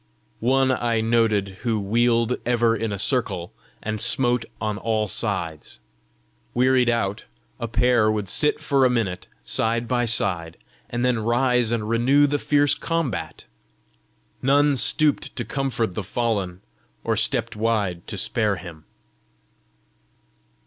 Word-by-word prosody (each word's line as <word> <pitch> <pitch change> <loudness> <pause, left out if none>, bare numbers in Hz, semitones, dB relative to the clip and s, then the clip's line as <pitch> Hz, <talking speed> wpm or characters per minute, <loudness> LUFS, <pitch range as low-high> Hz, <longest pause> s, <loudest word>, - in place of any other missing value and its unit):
One 130 +2 +2
I 120 -3 0
noted 110 -4 +1
who 115 -3 0
wheeled 115 +3 +1
ever 120 -1 +2
in 115 -1 -3
a 100 - -3
circle, 100 -6 +1 0.3
and 110 -1 -3
smote 120 0 +1
on 105 -1 -3
all 110 -2 -1
sides. 90 -8 -3 0.8
Wearied 125 0 +3
out, 110 -4 -1 0.3
a 115 - -3
pair 115 -1 +2
would 105 -2 -2
sit 150 +10 +1
for 140 -1 +1
a 130 - +5
minute 110 -7 -2 0.2
side 115 +1 0
by 120 -1 +1
side, 90 -8 0 0.3
then 120 0 0
rise 120 +1 +1
and 110 -3 -1
renew 125 +6 +3
the 145 0 0
fierce 145 0 +3
combat. 165 - -3 1.0
None 145 +2 +3
stooped 150 +3 +1
to 120 - -4
comfort 130 -7 -2
the 105 - -3
fallen, 100 -3 -2 0.4
or - - 0
stepped - - 0
wide 105 -6 -1
to 105 - -5
spare 105 +1 0
him. 85 -3 -11
115 Hz, 130 wpm, -23 LUFS, 105-125 Hz, 1.0 s, a